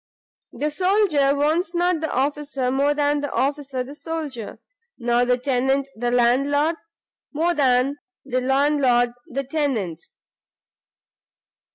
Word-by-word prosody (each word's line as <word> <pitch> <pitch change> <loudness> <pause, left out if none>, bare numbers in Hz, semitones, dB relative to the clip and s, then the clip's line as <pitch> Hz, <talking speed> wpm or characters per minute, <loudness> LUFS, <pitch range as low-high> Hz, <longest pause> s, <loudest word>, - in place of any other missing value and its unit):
The 300 +1 -2
soldier 355 -6 +2
wants 320 +4 0
not 350 -1 +1
the 315 - -2
officer 275 -1 -1
more 280 +2 +2
than 290 0 +1
the 290 - -4
officer 275 -1 -1
the 270 +3 -10
soldier, 295 -8 -6 0.4
nor 240 0 +1
the 250 0 +2
tenant 265 +1 0
the 240 +2 -1
landlord, 275 +6 +2 0.6
more 330 +4 +1
than 270 -2 +2 0.3
the 255 -1 -1
landlord 265 -2 +2 0.2
the 275 -2 -3
tenant. 255 - -2
280 Hz, 120 wpm, -22 LUFS, 250-295 Hz, 0.6 s, soldier